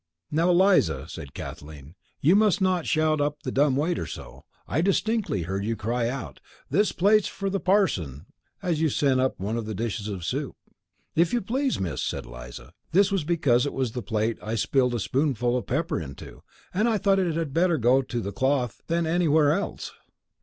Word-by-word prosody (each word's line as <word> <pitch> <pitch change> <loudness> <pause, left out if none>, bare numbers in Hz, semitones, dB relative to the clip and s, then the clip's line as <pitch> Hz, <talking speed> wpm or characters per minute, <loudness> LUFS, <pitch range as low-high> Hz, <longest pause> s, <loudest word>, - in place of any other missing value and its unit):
"Now, 165 +4 +2
Eliza," 175 - +3
said 70 -2 -9
Kathleen, 75 0 -9 0.3
"you 165 +7 +5
must 210 -2 +4
not 185 -3 +1
shout 155 -1 +2
up 145 0 -2
the 130 - -3
dumb 140 0 +3
waiter 160 +5 -1
so. - - -10 0.2
I 150 - 0
distinctly 195 - 0
heard 95 +3 -3
you 115 +2 -1
cry 115 +3 -1
out 130 -1 -6 0.3
'This 205 -1 +3
plate's 210 +3 +3
for 195 -1 -4
the 195 - 0
parson!' 130 - +1 0.4
as 165 -3 0
you 160 - +3
sent 135 -2 +2
up 130 0 0
one 105 +5 -2
of 115 -2 -4
the 110 - -4
dishes 110 -1 -3
of 95 -5 -5
soup." - - -3 0.6
"If 170 +5 +3
you 240 - +3
please, 260 +6 -1
Miss," 90 -5 -2
said - - -3
Eliza. - - -10 0.2
"That 200 +2 +4
was 195 -5 0
because 145 -6 +2
it - - -4
was 130 -4 -1
the 125 - -4
plate 110 0 -1
I 110 +2 -3
spilled 125 +2 +1
a - - -1
spoonful 125 0 0
of 120 -5 -3
pepper 140 - -1
into, 70 -4 -10 0.3
and 215 +6 +2
I 220 - +2
thought 195 -1 +2
it 175 -4 0
had 160 -4 -2
better 170 0 +3
go 125 +2 +4
to 120 -2 -4
the 100 -1 -4
cloth 130 -1 0
than 170 0 0
anywhere 160 -3 +3
else. 200 +4 -3
140 Hz, 195 wpm, -26 LUFS, 110-175 Hz, 0.6 s, you